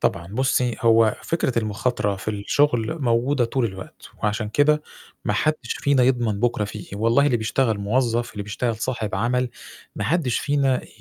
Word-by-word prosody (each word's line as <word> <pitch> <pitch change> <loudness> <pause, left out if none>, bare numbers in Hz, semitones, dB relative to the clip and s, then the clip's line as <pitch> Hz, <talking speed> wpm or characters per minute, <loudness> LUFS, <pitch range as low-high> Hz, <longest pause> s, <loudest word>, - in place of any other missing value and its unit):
طبعًا، 85 0 0
بُصّي 125 +2 0
هو 115 -2 +4
فكرة 135 -8 0
المُخاطرة 105 -1 -1
في 95 - -11
الشُغل 120 +6 0
موجودة 125 +2 +2
طول 125 +1 0
الوقت، 95 -3 -8
وعشان 105 +1 -1
كده 150 +6 +3 0.4
ما 105 - +1
حدش 155 +8 +2 0.2
فينا 140 -3 +3
يضمن 120 -5 +1
بُكرة 115 -2 +1
فيه 105 +1 -6
إيه، - - -5
والله 115 +6 +3
اللي 130 -5 +2
بيشتغل 110 0 0
موظف، 120 +3 0
اللي 105 - -5
بيشتغل 110 +3 -2
صاحب 110 -3 -3
عمل، 125 +4 0 0.5
ما 105 - -3
حدش 135 - +1
فينا 140 -3 +1
ي - - -14
120 Hz, 170 wpm, -23 LUFS, 105-130 Hz, 0.5 s, هو